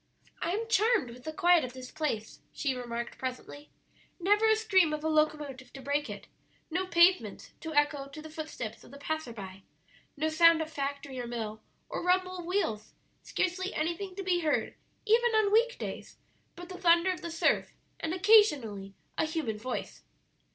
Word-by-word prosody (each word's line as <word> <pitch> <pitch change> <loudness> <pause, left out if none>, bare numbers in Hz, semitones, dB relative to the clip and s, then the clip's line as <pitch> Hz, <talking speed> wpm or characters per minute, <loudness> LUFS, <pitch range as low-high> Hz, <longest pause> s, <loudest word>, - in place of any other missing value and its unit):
"I - - -1
am 450 +3 -2
charmed 435 - +2
with 245 +1 -13
the 315 - -3
quiet 350 0 +4
of 250 -1 -5
this 255 -1 -9
place," 225 -9 -3
she 275 -3 -1
remarked 240 -1 -5
presently; 260 +3 -6 0.5
"never 415 +5 +3
a 440 - +6
scream 380 -7 +3
of 305 0 -4
a - - 0
locomotive 300 -5 0
to - - -9
break 285 +2 -1
it, - - -7 0.5
no 370 +3 -1
pavements 360 +1 +3
to 320 -2 -6
echo 290 -1 +2
to 280 +3 -10
the 310 - -8
footsteps 305 -8 -6
of - - -15
the 280 - -11
passer 315 -2 -3
by, 195 -3 -9 0.6
no 310 +2 0
sound 335 +1 +6
of 320 0 -4
factory 280 -1 -4
or 240 - -4
mill, 220 -2 -5 0.3
or - - -4
rumble 365 0 +1
of 345 - -7
wheels, 335 - -2 0.3
scarcely 370 +2 -2
anything 345 +4 -2
to 390 - -5
be 365 -2 +2
heard, 310 -3 0 0.3
even 460 +1 +3
on 430 -2 +3
week 475 +2 +3
days, - - -7 0.4
but 350 0 -10
the 365 0 -9
thunder 340 +1 +5
of 365 - -5
the 340 - -5
surf 330 - +1 0.2
and 320 - -2
occasionally 295 - +3 0.2
a - - +3
human 305 -10 -3
voice." 250 +3 -5
315 Hz, 180 wpm, -30 LUFS, 260-370 Hz, 0.6 s, a